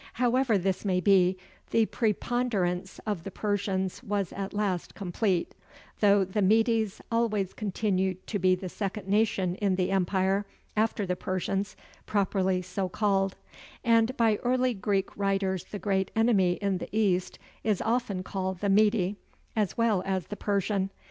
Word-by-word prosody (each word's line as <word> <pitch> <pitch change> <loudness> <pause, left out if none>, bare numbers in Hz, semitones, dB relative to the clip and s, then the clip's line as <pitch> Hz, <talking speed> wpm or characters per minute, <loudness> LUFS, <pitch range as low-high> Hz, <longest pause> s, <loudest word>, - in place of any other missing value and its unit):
However 245 -1 +2
this 190 0 -1
may 185 -3 +1
be, 185 -1 +4 0.3
the 225 -1 +3
preponderance 210 -5 -1
of 205 -6 -2
the 195 - -5
Persians 195 -2 -2
was 205 -6 -2
at 195 -1 -4
last 200 -4 -2
complete: 185 -1 -1 0.5
though 200 -2 +5
the 195 +3 -2
Medes 220 +1 +2
always 215 -5 0
continued 190 -3 -1
to 205 - -2
be 185 0 +4
the 185 +1 -6
second 195 +1 -4
nation 200 -3 +2
in 200 -3 +1
the 185 0 0
empire, 195 +1 +1 0.3
after 215 -1 +1
the 180 -1 -1
Persians, 190 +2 -2 0.3
properly 190 -2 +1
so 185 +1 -3
called; 195 -1 +1 0.5
and 230 +2 +3
by 225 -3 +3
early 255 +1 +1
Greek 195 -2 -1
writers 195 -2 0
the 205 - -6
great 195 -2 0
enemy 215 -6 +3
in 195 0 -1
the - - -6
East 195 -4 +1 0.3
is 210 -4 +1
often 225 -5 -1
called 190 -1 -3
"the 200 - +1
Mede" 205 -1 +3 0.4
as 210 -4 0
well 225 -5 +2
as 190 -2 -1
"the 210 - -4
Persian." 200 -1 0
200 Hz, 150 wpm, -28 LUFS, 185-215 Hz, 0.5 s, though